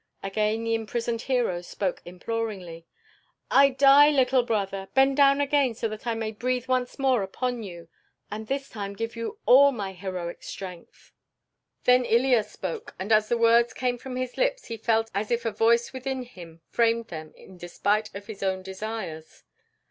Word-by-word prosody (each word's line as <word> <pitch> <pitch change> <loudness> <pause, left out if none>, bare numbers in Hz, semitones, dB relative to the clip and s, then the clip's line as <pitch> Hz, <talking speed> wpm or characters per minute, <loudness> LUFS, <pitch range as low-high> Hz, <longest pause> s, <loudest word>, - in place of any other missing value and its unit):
Again 215 +3 -1
the 230 0 0
imprisoned 230 +1 -2
hero 240 -10 0
spoke 185 +1 -3
imploringly. 180 -3 -5 0.6
"I 275 0 +7
die, 275 +2 +6
little 260 -3 +3
brother. 195 -5 -2
Bend 270 0 +4
down 280 0 +5
again 285 -4 +2
so 225 - -2
that 215 +3 -8
I 230 - 0
may 220 -1 -3
breathe 250 +3 -2
once 255 -1 -1
more 265 -5 +2
upon 245 +5 -3
you, 170 -5 -9 0.4
and 215 +1 -6
this 275 +2 -2
time 200 -2 -6
give 225 +3 -4
you 230 - -5
all 280 +3 +7
my 200 -6 -5
heroic 180 -2 -6
strength." 180 -3 -10 0.7
Then 250 0 +5
Ilya 240 -1 +3
spoke, 185 -4 -7
and 190 +4 -5
as 215 0 +4
the 240 - +2
words 235 +1 +4
came 245 -1 -1
from 255 +1 -7
his 255 -1 -4
lips - - 0
he 230 - -6
felt 225 0 0
as 205 +2 -2
if 235 0 -1
a 225 - 0
voice 230 +3 +2
within 260 0 -4
him 170 -9 -13
framed 230 0 +1
them 155 -2 -8
in 190 - -15
despite 205 +5 -1
of 200 0 -7
his 215 -2 -9
own 190 -1 -1
desires. 190 -5 -7
225 Hz, 175 wpm, -26 LUFS, 195-250 Hz, 0.7 s, I